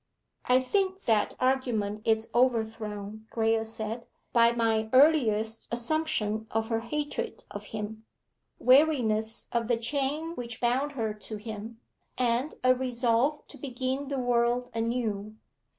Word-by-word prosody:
'I 255 +1 +4
think 380 +7 0
that 215 -3 +2
argument 240 -6 0
is 220 0 +2
overthrown,' 220 -3 -1
Graye 225 -1 +1
said, 225 +1 -5 0.3
'by 235 -1 +6
my 225 -2 +1
earliest 230 -7 +3
assumption 235 -4 -1
of 225 0 -1
her 225 -1 +1
hatred 290 +6 -3
of - - -7
him, 215 0 -6 0.5
weariness 240 -5 +3
of 235 -1 0
the 240 -1 +2
chain 285 +6 -1
which 240 -6 -6
bound 260 +4 +1
her 225 -5 -2
to 210 +1 -7
him, 220 +1 -7 0.4
and 245 +3 +1
a 255 0 +6
resolve 255 +3 +1
to - - -12
begin 260 +1 -3
the 275 0 -2
world 245 0 +1
anew. 225 -3 -2
235 Hz, 130 wpm, -28 LUFS, 220-255 Hz, 0.5 s, by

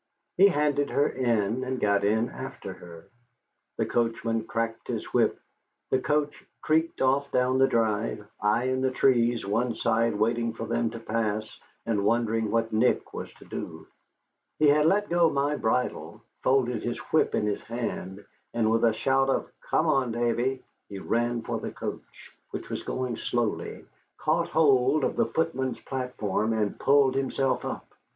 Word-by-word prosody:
He 195 - +7
handed 145 -5 +1
her 145 - +2
in, 120 -2 0
and 130 0 -3
got 100 -1 +2
in 110 +3 +2
after - - -7
her. 85 -2 -12 0.7
The - - +1
coachman 115 -1 -1
cracked 115 0 -3
his - - -3
whip, - - +2 0.5
the 130 - +3
coach 150 +1 -1 0.2
creaked 160 +2 0
off 135 +2 +2
down 130 +1 +2
the 135 - +6
drive, 110 -2 0
I 105 +3 +2
in 130 0 0
the 130 - +2
trees 120 -3 +2
one 115 +4 0
side 115 0 +1
waiting 115 +2 0
for 115 - -5
them 115 0 0
to 115 +1 -8
pass, 110 -1 -2 0.3
and 105 -3 0
wondering 115 0 +1
what 115 +1 0
Nick 115 +3 +1
was - - -6
to - - -17
do. - - -7 0.7
He 150 -1 +5
had 150 +2 +4
let 205 +4 +2
go 170 -1 +3
my 145 0 0
bridle, 125 0 -2 0.2
folded 125 -4 +2
his 120 - -3 0.2
whip 160 - +3
in - - +1
his 105 -1 -1
hand, 105 -4 -5 0.3
and 110 -2 +2
with 115 0 +2
a 115 -2 +4
shout 135 +4 +2
of - - -1 0.2
"Come 155 - +2
on, 135 -6 +2
Davy," 120 +3 0 0.3
he 100 - -7
ran 120 +3 -1
for - - -3
the - - -4
coach, - - -8 0.2
which - - -7
was - - -3
going 130 -2 -3
slowly, 120 -3 -2 0.3
caught - - +1
hold 140 -2 +3
of - - 0
the - - +2
footman's 130 -6 -1
platform, 115 -5 -2
and 105 -2 -1
pulled 140 -1 +4
himself 135 0 0
up. - - -5
120 Hz, 165 wpm, -27 LUFS, 110-135 Hz, 0.7 s, He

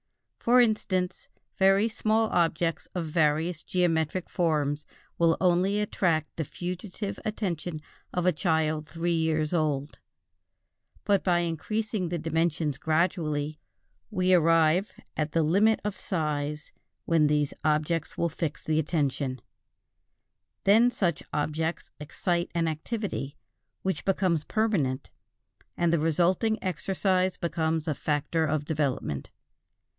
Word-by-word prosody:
For 245 +2 +4
instance, 195 -6 +1 0.3
very 195 +3 +5
small 220 0 +1
objects 165 -1 0
of 175 -2 -1
various 160 +1 +1
geometric 175 -1 0
forms 150 -4 0 0.3
will 165 -1 +4
only 185 +3 +2
attract 170 -6 0
the 160 - -2
fugitive 185 +6 -5
attention 175 -7 -3 0.3
of 180 -1 -1
a 180 - +5
child 155 -2 0
of - - -20
three 170 +1 -1
years 160 -1 0
old; 150 -3 -1 1.0
but 200 -2 +2
by 175 -2 +3
increasing 185 +4 -2
the 175 - -1
dimensions 160 -2 0
gradually, 155 -2 0 0.5
we 185 -3 +2
arrive 165 +2 +4 0.2
at 150 -1 -2
the 165 - +3
limit 205 +8 +3
of 210 -1 -3
size 150 -4 -2 0.3
when 160 -3 +4
these 150 -1 +1
objects 155 +1 0
will 170 - +2
fix 160 -1 -4
the 155 0 +1
attention; 140 -4 -1 1.2
then 220 +5 +6
such 175 -10 -1
objects 155 +2 -2
excite 170 +4 -1
an 165 -1 +1
activity 160 - -3 0.5
which 190 0 -1
becomes 185 -5 +1
permanent, 165 - 0 0.7
and 170 -1 +2
the 170 - +3
resulting 175 +8 +2
exercise 185 0 0
becomes 160 -1 -1
a 155 - +1
factor 150 +3 0
of 150 0 -1
development. 140 - -2
165 Hz, 120 wpm, -28 LUFS, 155-185 Hz, 1.2 s, then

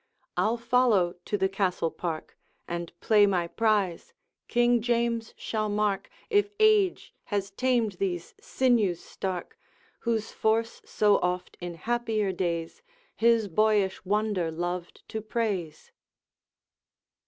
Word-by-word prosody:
I'll 225 +3 +1
follow 235 -7 +3
to 205 - -1
the 190 -1 +2
Castle 190 -4 0
park, 165 -3 -5 0.3
And 170 -1 -4
play 210 -2 +5
my 180 -3 +1
prize; 205 -4 0 0.3
King 240 0 +3
James 235 -1 0
shall 215 -1 -2
mark 205 -2 0 0.2
If 410 -2 +2
age 430 -4 +3
has 200 -1 -2
tamed 240 0 +1
these 175 -3 -2
sinews 225 -9 +2
stark, 185 -1 -5 0.4
Whose 225 -2 -1
force 225 +1 0
so 210 -1 +3
oft 180 0 -2
in 175 -1 -5
happier 225 +1 -1
days 170 - -3 0.3
His 230 -2 +3
boyish 205 0 +2
wonder 205 -3 0
loved 175 +2 -5
to 220 - -4
praise.' 210 -8 -3
210 Hz, 120 wpm, -28 LUFS, 180-230 Hz, 0.4 s, play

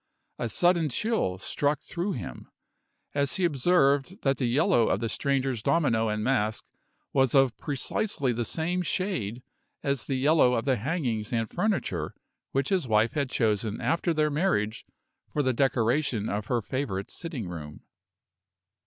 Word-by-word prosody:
A 120 - -1
sudden 170 - +3
chill 175 - 0
struck 145 +9 -1
through 180 +4 -2
him, 65 - -7 0.6
as 140 -1 0
he 185 - +1
observed 150 - +2
that 135 -1 +2
the 125 - +1
yellow 120 -2 +3
of 95 - +1
the 115 - -1
stranger's 130 +2 0
domino 125 -5 +2
and 105 0 -1
mask 110 -4 0 0.5
was 135 -2 +3
of 135 -3 +4
precisely 145 - -1
the 120 +1 -1
same 170 +8 -1
shade 130 - -2 0.4
as 140 -2 -1
the 135 - -1
yellow 130 -2 +4
of 115 - -1
the 130 -3 +2
hangings 120 - -2
and 115 -2 0
furniture 175 - -1 0.4
which 135 0 0
his 185 -8 +1
wife 110 0 +3
had 140 -3 -1
chosen 110 -3 0
after 170 +1 +1
their 155 -1 +1
marriage 145 - 0 0.4
for 150 - 0
the 130 -1 +2
decoration 120 -2 +1
of 105 +1 -3
her 120 -3 0
favorite 115 -7 -3
sitting 155 - -5
room. 75 -4 -8
135 Hz, 155 wpm, -27 LUFS, 110-155 Hz, 0.6 s, of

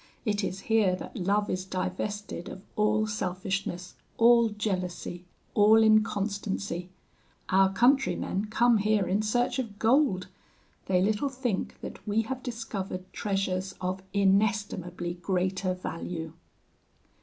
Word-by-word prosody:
It 205 -2 0
is 190 0 -3
here 210 -4 +3
that - - -9
love 205 +3 +1
is 185 0 -2
divested 190 +1 -4
of 190 - -9
all 215 0 +2
selfishness, 185 -3 -3 0.2
all 235 0 +6
jealousy, 185 -4 -3 0.3
all 210 +1 +6
inconstancy. 200 -4 +1 0.6
Our 190 0 +4
countrymen 245 -4 +2
come 235 +2 +3
here 210 -1 +2
in 195 +4 +1
search 245 +4 +1
of 220 -5 -4
gold; 225 -5 +3 0.6
they 185 -1 +3
little 215 +7 +1
think 250 -7 -3
that - - -9
we 215 +2 +2
have 260 +3 -5
discovered 200 -6 -5
treasures 190 -2 -2
of 185 +1 -2
inestimably 195 -3 0
greater 185 +1 0
value.' 165 -2 -5
200 Hz, 120 wpm, -28 LUFS, 185-215 Hz, 0.6 s, all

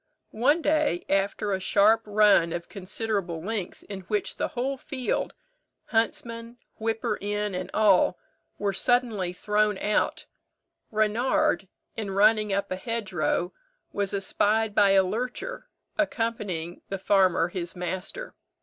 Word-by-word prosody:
One 290 +9 +2
day, 300 - +1
after 195 +1 0
a 190 - 0
sharp 210 +4 +4
run 205 -5 +4
of 170 0 -5
considerable 195 -3 -3
length, 195 +1 -4
in 200 -2 -7
which 210 -2 -1
the - - 0
whole 265 +3 0
field, 260 -1 -3 0.5
huntsman, 230 +1 -1 0.2
whipper 225 -1 -1
in, 205 0 -2
and 185 0 -4
all, 195 -4 +4 0.4
were 200 -1 -1
suddenly 220 -3 +1
thrown 210 +2 +1
out, 210 +2 0 0.6
Reynard, 225 +4 +1 0.3
in 215 -3 -4
running 210 +2 +3
up 200 0 -1
a 185 - -1
hedgerow, 190 -5 -1 0.4
was 200 -1 -1
espied 210 +2 +1
by 200 -2 +5
a 195 -1 +6
lurcher, 250 - -4 0.3
accompanying 210 - -2
the 195 - -2
farmer 185 -3 +3
his 175 0 -5
master. 185 - -5
210 Hz, 125 wpm, -26 LUFS, 190-225 Hz, 0.6 s, a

